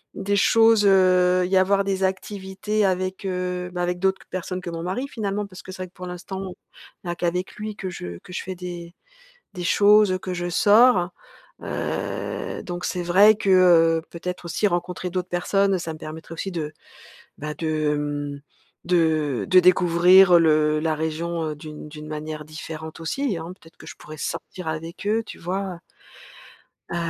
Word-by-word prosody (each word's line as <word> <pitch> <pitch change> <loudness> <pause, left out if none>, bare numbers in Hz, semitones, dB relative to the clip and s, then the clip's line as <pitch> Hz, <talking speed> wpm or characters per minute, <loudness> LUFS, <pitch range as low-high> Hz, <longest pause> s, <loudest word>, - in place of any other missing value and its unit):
des 200 +1 -1
choses, 225 +1 +5
heu, 185 -1 +4
y 190 +2 0
avoir 195 +1 +3
des 195 -1 -1
activités 195 +2 -2
avec, 185 0 -1
heu, 180 -1 -2
bah, 180 -1 -3
avec 180 0 -1
d'autres 190 +1 +1
qu - - -18
personnes 185 0 -4
que 180 - -6
mon 165 0 -5
mari, 190 +10 -3
finalement, 210 -5 -3
parce 190 -2 -11
que - - -10
c'est 185 0 -6
vrai - - -7
que - - -42
pour 180 0 -8
l'instant, 190 +1 -6 0.5
il - - -9
y - - +1
a - - -4
qu'avec 180 +1 -2
lui 215 0 -5
que 190 -3 -5
je 90 - -7
que 180 - -13
je - - -3
fais 185 0 -6
des 175 -1 -8 0.6
des 180 -2 -5
choses, 205 +1 +5
que 185 - -4
je 175 0 -3
sors. 205 -1 +5 0.5
Heu, - - -4
donc, 175 0 -5
c'est 180 - -2
vrai 200 +5 +6
que, 205 - -3
heu, 165 -3 +5
peut-être 180 +1 -6
aussi 170 +5 0
rencontrer 180 0 -3
d'autres 180 0 -3
personnes, 195 +2 +1
ça 165 -2 -5
me - - -11
permettrait 160 +1 -9
aussi 195 +4 -4
de, 155 -3 -4 0.7
bah, 150 +1 -5
de, 155 -1 0
mmh, 145 -1 -4 0.4
de 160 -6 +1
de 185 -1 +7
découvrir 180 0 +6
le 155 -1 +3
la 155 0 0
région, 160 +2 -2
heu, - - -6
d'une 150 0 -9
d'une 150 0 -9
manière 155 0 -6
différente 155 +1 -8
aussi, 245 - -1
hein. 165 +2 -6
Peut-être 165 - -19
que - - -13
je - - -9
pourrais 155 0 -11
sortir 180 +3 -5
avec 165 +4 -6
eux, 220 +2 +1
tu - - -10
vois? 185 0 -3 1.1
Heu, - - -2
180 Hz, 185 wpm, -23 LUFS, 165-190 Hz, 1.1 s, de